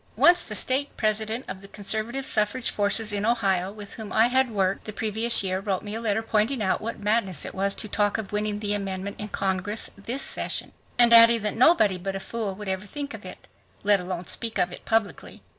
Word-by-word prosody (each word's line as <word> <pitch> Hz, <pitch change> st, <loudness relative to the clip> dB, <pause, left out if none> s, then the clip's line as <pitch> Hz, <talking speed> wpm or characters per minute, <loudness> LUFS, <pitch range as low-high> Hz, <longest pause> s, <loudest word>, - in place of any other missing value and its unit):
Once 350 Hz, +1 st, +5 dB
the 215 Hz, -, -2 dB
state 265 Hz, +7 st, +2 dB
president 220 Hz, +2 st, -1 dB
of 190 Hz, 0 st, -7 dB
the 195 Hz, -, -12 dB
conservative 220 Hz, +6 st, -3 dB
suffrage 215 Hz, +3 st, +1 dB
forces 210 Hz, +1 st, 0 dB
in 205 Hz, 0 st, -2 dB
Ohio 195 Hz, -5 st, +1 dB
with 205 Hz, -1 st, -10 dB
whom 220 Hz, -2 st, -8 dB
I 225 Hz, +2 st, +4 dB
had 260 Hz, 0 st, +2 dB
worked 195 Hz, -3 st, -1 dB
the 215 Hz, -, -5 dB
previous 220 Hz, +1 st, +2 dB
year 185 Hz, -1 st, -1 dB
wrote 195 Hz, -1 st, -3 dB
me 205 Hz, 0 st, -6 dB
a 225 Hz, -, -3 dB
letter 220 Hz, -1 st, 0 dB
pointing 225 Hz, +4 st, 0 dB
out 190 Hz, -3 st, 0 dB
what 230 Hz, +2 st, -5 dB
madness 205 Hz, -5 st, 0 dB
it -, -, -7 dB
was 195 Hz, +1 st, 0 dB
to -, -, -1 dB
talk 205 Hz, 0 st, 0 dB
of 220 Hz, -3 st, -6 dB
winning 210 Hz, 0 st, -2 dB
the 205 Hz, -1 st, 0 dB
amendment 195 Hz, -1 st, -4 dB
in 210 Hz, -, -5 dB
Congress 195 Hz, +1 st, -1 dB
"this 240 Hz, +7 st, -3 dB
session," -, -, -1 dB, 0.3 s
and 240 Hz, -1 st, +5 dB
adding 230 Hz, -1 st, +7 dB
that 210 Hz, -, 0 dB
"nobody 225 Hz, -, +4 dB
but 195 Hz, +2 st, -4 dB
a -, -, -3 dB
fool 210 Hz, -1 st, -5 dB
would 210 Hz, +1 st, -9 dB
ever 190 Hz, +1 st, -3 dB
think 285 Hz, +4 st, -6 dB
of -, -, -9 dB
it, -, -, -8 dB, 0.4 s
let 205 Hz, -1 st, +3 dB
alone 180 Hz, 0 st, -5 dB
speak 230 Hz, +4 st, -2 dB
of 180 Hz, -, +1 dB
it -, -, -10 dB
publicly." 225 Hz, -2 st, -2 dB
210 Hz, 220 wpm, -25 LUFS, 195-230 Hz, 0.4 s, adding